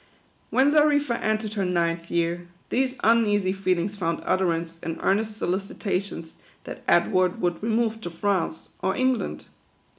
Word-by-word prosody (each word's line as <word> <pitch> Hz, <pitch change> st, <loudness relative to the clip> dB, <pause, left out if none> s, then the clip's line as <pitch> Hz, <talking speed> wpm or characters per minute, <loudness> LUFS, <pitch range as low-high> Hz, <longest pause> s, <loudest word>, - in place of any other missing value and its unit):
When 270 Hz, +3 st, +4 dB
Xarifa 290 Hz, -4 st, +3 dB
entered 215 Hz, 0 st, -1 dB
her 200 Hz, -2 st, -1 dB
ninth 170 Hz, -2 st, 0 dB
year, 170 Hz, +1 st, -1 dB, 0.2 s
these 260 Hz, +1 st, +1 dB
uneasy 205 Hz, -4 st, +3 dB
feelings 190 Hz, 0 st, 0 dB
found 170 Hz, -4 st, -2 dB
utterance 170 Hz, -3 st, 0 dB
in 165 Hz, -1 st, -4 dB
earnest 215 Hz, +2 st, +1 dB
solicitations 195 Hz, -3 st, -3 dB, 0.3 s
that -, -, -8 dB
Edward 180 Hz, +1 st, +3 dB
would 175 Hz, -2 st, -1 dB
remove 225 Hz, 0 st, 0 dB
to 175 Hz, -, -5 dB
France, 175 Hz, -1 st, -2 dB
or 190 Hz, -, 0 dB
England. 255 Hz, -2 st, 0 dB
195 Hz, 130 wpm, -25 LUFS, 175-220 Hz, 0.3 s, When